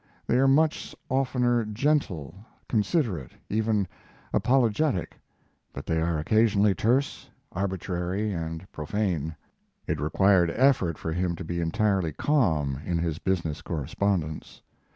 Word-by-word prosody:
They 120 - +2
are 135 - +4
much 155 +3 +2
oftener 125 -2 +1
gentle, 105 - -1 0.3
considerate, 105 - 0 0.2
even 110 -2 +1 0.5
apologetic, 125 - +1 0.6
but 70 - -7
they 80 -1 0
are 85 0 0
occasionally 105 +4 +3
terse, 125 +9 0 0.2
arbitrary, 95 +1 -2
and 80 0 -4
profane. 80 -1 -2 0.5
It - - -2
required 90 +3 +3
effort 120 - +3
for 80 - -3
him 90 0 -1
to 95 - -7
be 85 +1 -3
entirely 95 -1 +1
calm 80 - +1
in 85 +1 -1
his 80 -1 -2
business 85 -6 -1
correspondence. 80 +1 -2
95 Hz, 115 wpm, -27 LUFS, 80-115 Hz, 0.6 s, are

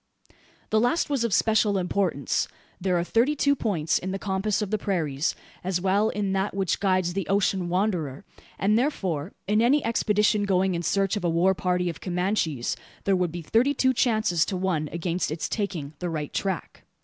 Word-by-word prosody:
The 215 - +4
last 245 +7 +1
was 270 -4 +1
of 235 - 0
special 215 +1 +3
importance. 180 -6 0 0.3
There 180 -1 +1
are 170 - +1
thirty 235 +10 +2
two 280 0 +3
points 175 - 0
in 185 - -5
the 195 - -2
compass 195 +1 -1
of 200 - -5
the 215 - 0
prairies, 160 -8 -1 0.3
as 185 -1 0
well 195 +4 +2
as - - -6
in 200 -2 -1
that 195 +1 -1
which 195 -3 0
guides 185 -3 +1
the 195 -1 -3
ocean 195 -2 +1
wanderer; 175 -7 -1 0.3
and, 210 +3 +3
therefore, 185 - -2
in 210 +2 +3
any 275 +5 +3
expedition 210 -2 +2
going 190 -1 +2
in 170 - -1
search 195 +3 +1
of 205 - -5
a 175 - +2
war 175 +3 +3
party 180 0 0
of 165 -3 -5
Comanches, 180 - -1 0.3
there 195 - +2
would 180 -2 0
be 170 0 -6
thirty 240 - +2
two 260 0 +3
chances 220 - +2
to 190 - -3
one 175 -5 -1
against 170 +1 -2
its 155 +1 -3
taking 175 -9 -3
the 180 - -2
right 150 -3 -4
track. 190 -4 -3
190 Hz, 195 wpm, -26 LUFS, 175-210 Hz, 0.3 s, The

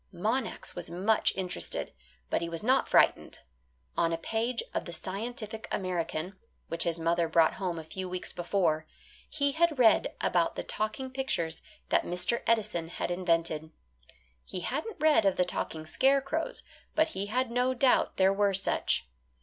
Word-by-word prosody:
Monax 220 +7 -2
was - - -7
much 195 +6 +2
interested, 185 -2 -3 0.4
but - - +1
he 170 - -2
was 165 +2 -4
not 260 +4 +3
frightened. - - +3 0.6
On 165 - +2
a 165 - 0
page 225 +7 -1
of - - -2
the 170 - -7
"Scientific 220 +5 -5
American," 180 -1 -2 0.3
which 165 - +1
his 170 -1 0
mother 170 +1 +1
brought 160 0 +4
home 180 -3 -1
a 160 - -5
few 185 +3 -5
weeks 180 0 -5
before, 170 -3 0 0.4
he 285 -2 +1
had 320 0 +2
read 230 -4 +4
about 175 -2 +1
the - - -3
talking 215 +5 -3
pictures 175 -12 -1 0.3
that - - +4
Mr. 180 +7 -1
Edison 215 -7 +1
had 175 - -3
invented. 165 -3 0 0.7
He 180 - -5
hadn't 310 - -3
read 305 -6 +5
of 195 -2 +3
the 180 - +2
talking 160 -2 -4
scarecrows, 275 - +1 0.3
but 315 +1 +3
he 200 -7 -3
had 250 +3 0
no 250 +2 +1
doubt 255 0 +3
there 190 0 +5
were 200 -1 +2
such. 185 - +1
195 Hz, 160 wpm, -30 LUFS, 170-245 Hz, 0.7 s, read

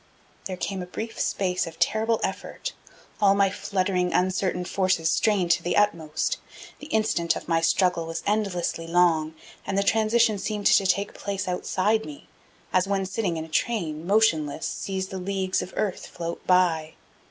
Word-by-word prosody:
There 185 -1 -4
came 190 0 -3
a 180 - -6
brief 225 +5 -6
space 180 -3 0
of 165 0 -9
terrible 220 +6 +1
effort, - - -4 0.5
all 200 -1 +5
my 200 -1 +3
fluttering, 185 -2 -1
uncertain 180 -1 0
forces 185 -4 +1
strained 190 -2 +2
to 170 - +3
the 175 +1 -1
utmost. 165 -7 +1 0.4
The 295 - -9
instant 215 - +1
of - - -7
my 165 -1 +2
struggle 170 -1 +2
was 165 0 -4
endlessly 190 -5 -1
long 165 -2 +2 0.3
and 195 - -2
the 200 - +3
transition 220 0 +3
seemed 210 0 -3
to 195 - +5
take 200 +2 +1
place 200 -1 -4
outside 190 +4 0
me 295 -1 -10 0.5
as 185 +1 +3
one 195 -1 0
sitting 190 -3 -2
in 160 - -4
a - - -12
train, 160 -2 -1
motionless, 180 -8 +2
sees 190 -1 -3
the 190 - -5
leagues 190 0 -1
of 185 - -7
earth 205 -4 -2
float 170 0 -6
by. 170 -4 +2
185 Hz, 165 wpm, -25 LUFS, 170-200 Hz, 0.5 s, all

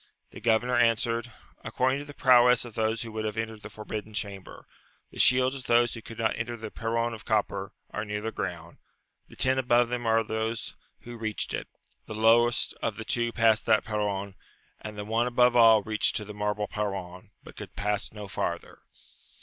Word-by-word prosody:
The - - -10
governor 120 +2 +2
answered, 115 0 +1 0.3
according 130 +2 0
to 145 - -7
the 145 0 -11
prowess 125 -1 +5
of 120 - -10
those 110 +1 0
who 115 - -8
would 110 0 -4
have 110 0 -3
entered 110 -1 -4
the 110 - -9
forbidden 105 0 -7
chamber; 100 -3 -6 0.5
the - - -10
shields 130 +1 +5
of 130 -2 -7
those 120 0 +3
who 115 - -7
could 115 0 -11
not 110 -1 0
enter 120 +1 -4
the 110 -1 -7
perron 115 +1 -1
of 110 - -9
copper, 100 -3 -1 0.2
are - - -3
near 105 -1 -3
the 110 +2 -4
ground; 85 -5 -6 0.5
the - - -15
ten 130 0 +2
above 120 -1 +3
them 120 -1 -3
are 110 0 +4
of 115 -1 0
those 110 +1 -3 0.3
who 120 0 -9
reached 110 -2 -3
it; - - -3 0.4
the 110 - -6
lowest 115 +2 +3
of 115 - -1
the 110 - -7
two 120 +1 0
passed 110 -2 +2
that 110 -1 +4
perron, 100 -2 -2 0.5
and 105 -1 -8
the 105 - -5
one 115 +3 +1
above 125 0 +3
all 115 -3 +7
reached 110 0 +1
to 105 - -2
the 105 - -8
marble 105 0 -2
perron, 95 -2 -5
but - - -13
could - - -10
pass 105 0 -1
no 105 -1 -8
farther. - - -4
110 Hz, 200 wpm, -28 LUFS, 105-120 Hz, 0.5 s, all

